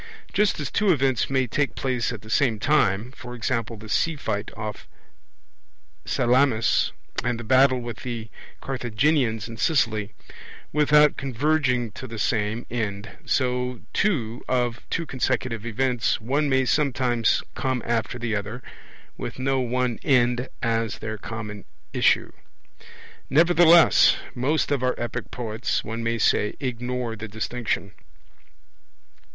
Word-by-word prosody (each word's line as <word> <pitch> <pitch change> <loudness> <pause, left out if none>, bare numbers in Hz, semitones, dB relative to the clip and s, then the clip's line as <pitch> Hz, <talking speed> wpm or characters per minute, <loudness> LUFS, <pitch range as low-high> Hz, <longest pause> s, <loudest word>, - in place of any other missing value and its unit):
Just 210 -4 +2
as 145 - -4
two 205 -2 +3
events 135 -5 +1
may 130 -1 +2
take 140 +4 -1
place 125 -3 -1
at 110 -4 -7
the 110 - -12
same 125 -6 +2
time, 120 -3 +1
e.g. 120 -1 -2
the 110 +1 -11
sea 165 +9 +1
fight 105 -7 -3
off 110 -1 -6 1.2
Salamis 125 -2 +2 0.3
and 120 0 -1
the - - -6
battle 130 +2 +4
with 120 -3 -6
the 115 -3 -6 0.3
Carthaginians 125 -2 0
in 115 -1 -9
Sicily, 110 -8 +1 0.6
without 150 0 +5
converging 130 -3 0
to 130 +5 -8
the 115 -1 -7
same 110 +1 -1
end, 105 -3 -3
so 125 -2 0
too 125 - 0
of 120 -2 0
two 165 - -1
consecutive 120 -4 -2
events 125 +1 0
one 140 +6 0
may 130 -1 +3
sometimes 125 -5 +1
come 130 -3 -2
after 115 0 -1
the 115 -2 -2
other 105 +5 -5 0.6
with - - -5
no 135 +1 0
one 125 -1 -1
end 125 -1 +2
as 115 -2 0
their 110 -1 -5
common 105 -2 -6 0.3
issue. - - +2 1.0
Nevertheless 170 +1 +6 0.2
most 145 +5 0
of 140 -3 +1
our 125 0 +1
epic 120 0 -4
poets, 110 -3 -2
one 115 +1 -5
may 115 0 -1
say, 105 -1 +2
ignore 125 -2 -3
the 110 +1 -7
distinction. 110 -2 -3
125 Hz, 130 wpm, -24 LUFS, 115-135 Hz, 1.2 s, Nevertheless